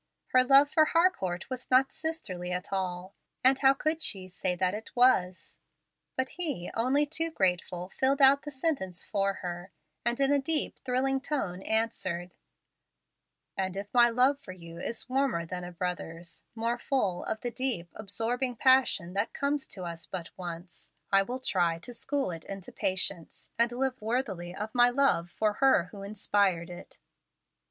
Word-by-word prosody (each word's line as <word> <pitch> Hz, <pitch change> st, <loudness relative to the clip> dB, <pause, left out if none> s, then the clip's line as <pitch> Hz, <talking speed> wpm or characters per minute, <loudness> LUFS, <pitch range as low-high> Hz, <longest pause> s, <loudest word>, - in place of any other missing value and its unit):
Her 255 Hz, 0 st, +5 dB
love 275 Hz, +3 st, +6 dB
for 315 Hz, -, +5 dB
Harcourt 310 Hz, -, +1 dB
was 255 Hz, 0 st, -5 dB
not 260 Hz, +1 st, +4 dB
sisterly 185 Hz, -, -4 dB
at 180 Hz, +2 st, -3 dB
all, 185 Hz, 0 st, -3 dB, 0.3 s
and 260 Hz, +1 st, +5 dB
how 270 Hz, 0 st, +5 dB
could 310 Hz, +3 st, -1 dB
she 190 Hz, -8 st, -2 dB
say 180 Hz, 0 st, -2 dB
that 185 Hz, +1 st, +1 dB
it 215 Hz, +2 st, -6 dB
was? 190 Hz, -8 st, +2 dB, 0.6 s
But 260 Hz, 0 st, -1 dB
he, 290 Hz, -, -2 dB
only 260 Hz, +6 st, +2 dB
too 325 Hz, +3 st, -1 dB
grateful, 180 Hz, -, -1 dB
filled 270 Hz, +6 st, +1 dB
out 275 Hz, 0 st, +7 dB
the 295 Hz, -, -7 dB
sentence 260 Hz, -, -2 dB
for 195 Hz, -1 st, 0 dB
her, 175 Hz, +1 st, -5 dB, 0.3 s
and 235 Hz, +1 st, 0 dB
in 275 Hz, 0 st, +3 dB
a 285 Hz, -, +3 dB
deep, 305 Hz, +2 st, -1 dB
thrilling 265 Hz, +1 st, 0 dB
tone 195 Hz, -12 st, -2 dB
answered, 185 Hz, -6 st, -1 dB, 1.2 s
"And 190 Hz, 0 st, -2 dB
if 200 Hz, +1 st, -6 dB
my 240 Hz, -1 st, +6 dB
love 255 Hz, +4 st, +3 dB
for 185 Hz, -, -10 dB
you 170 Hz, -2 st, -11 dB
is 230 Hz, -, -3 dB
warmer 260 Hz, -10 st, 0 dB
than 180 Hz, +1 st, -5 dB
a 175 Hz, -, -7 dB
brother's, 170 Hz, -1 st, -5 dB
more 235 Hz, +1 st, -1 dB
full 205 Hz, -10 st, 0 dB
of 220 Hz, -, -3 dB
the 245 Hz, -, -3 dB
deep, 230 Hz, -10 st, -3 dB
absorbing 230 Hz, +5 st, -2 dB
passion 255 Hz, -8 st, +3 dB
that 200 Hz, +3 st, -1 dB
comes 280 Hz, 0 st, -1 dB
to 185 Hz, -, -7 dB
us 170 Hz, -2 st, -6 dB
but 175 Hz, -3 st, -5 dB
once, 175 Hz, -1 st, -8 dB, 0.2 s
I 195 Hz, 0 st, +6 dB
will 245 Hz, +6 st, -4 dB
try 175 Hz, -9 st, +1 dB
to 210 Hz, +9 st, -10 dB
school 275 Hz, -2 st, -1 dB
it 165 Hz, -1 st, -8 dB
into 195 Hz, -2 st, -7 dB
patience, 185 Hz, -2 st, -2 dB
and 235 Hz, +1 st, +3 dB
live 260 Hz, 0 st, -2 dB
worthily 210 Hz, -7 st, -2 dB
of 215 Hz, +2 st, -5 dB
my 245 Hz, 0 st, +6 dB
love 245 Hz, -10 st, +2 dB
for 210 Hz, +3 st, 0 dB
her 230 Hz, -10 st, +4 dB
who 200 Hz, -, -9 dB
inspired 200 Hz, -3 st, 0 dB
it." 175 Hz, -, -11 dB
215 Hz, 170 wpm, -29 LUFS, 180-265 Hz, 1.2 s, out